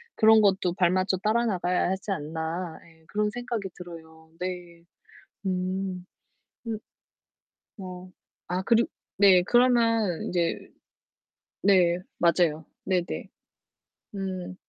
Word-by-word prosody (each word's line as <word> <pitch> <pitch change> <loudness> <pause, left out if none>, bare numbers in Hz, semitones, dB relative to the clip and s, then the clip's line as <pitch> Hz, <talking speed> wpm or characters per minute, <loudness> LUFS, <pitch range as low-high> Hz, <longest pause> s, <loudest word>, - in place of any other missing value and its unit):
그런 220 -1 +6
것도 190 -3 +2
발맞춰 185 +1 +2
따라 220 +5 +1
나가야 180 -3 +1
하지 190 +2 -4
않나. 160 +1 -4
예 160 -1 -21
그런 210 0 0
생각이 235 -4 -4
들어요. 160 -2 -12
네. 175 -2 -6 0.6
음. 185 0 -2 0.6
음. 220 -2 -2 1.0
어 185 -1 -8 0.4
아 180 +1 -1
그리 230 +3 +4 0.3
네 190 -3 +7
그러면 230 -5 +3
인제 170 -2 0 1.0
네 180 -3 +4 0.2
맞아요. 170 -2 +2 0.2
네네. 180 -2 -1 0.9
음. 185 -2 -4
185 Hz, 185 characters per minute, -27 LUFS, 175-200 Hz, 1.0 s, 네